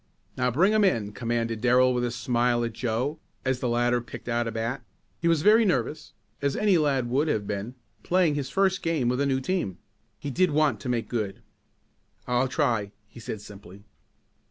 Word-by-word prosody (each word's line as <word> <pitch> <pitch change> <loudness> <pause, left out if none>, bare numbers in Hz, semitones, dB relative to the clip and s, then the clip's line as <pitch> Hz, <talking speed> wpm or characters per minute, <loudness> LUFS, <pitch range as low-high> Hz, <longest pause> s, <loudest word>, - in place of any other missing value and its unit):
"Now, 125 -1 +1
bring 180 - +3
him 215 -1 +4
in," 115 - +1
commanded 115 -1 -2
Darrell 125 +1 +4
with 125 0 0
a 120 - 0
smile 120 0 +1
at 115 -1 -3
Joe, 125 +7 -2 0.3
as 130 -1 0
the 125 -2 -1
latter 120 +1 +2
picked 120 +1 -10
out 120 -1 0
a - - -2
bat. 115 +4 -3 0.4
He 170 - 0
was 165 -3 +2
very 220 +2 +6
nervous, 150 - -1 0.3
as 140 -1 0
any 200 -5 +3
lad 135 -5 +1
would 135 +6 +1
have 105 -9 0
been, 105 +5 -4 0.3
playing 180 -4 +2
his 140 -2 -3
first 195 +3 +1
game 155 -7 0
with 125 +2 0
a 140 - +2
new 135 -1 +1
team. 135 - -2 0.4
He 145 - -5
did 185 +6 +2
want 145 -7 +2
to 125 - -5
make 120 -2 -1
good! 105 -5 -3 0.8
"I'll 125 +1 +1
try," 110 -5 0
he 115 - -14
said 110 -2 -6
simply. 100 -1 -13
125 Hz, 195 wpm, -26 LUFS, 115-150 Hz, 0.8 s, very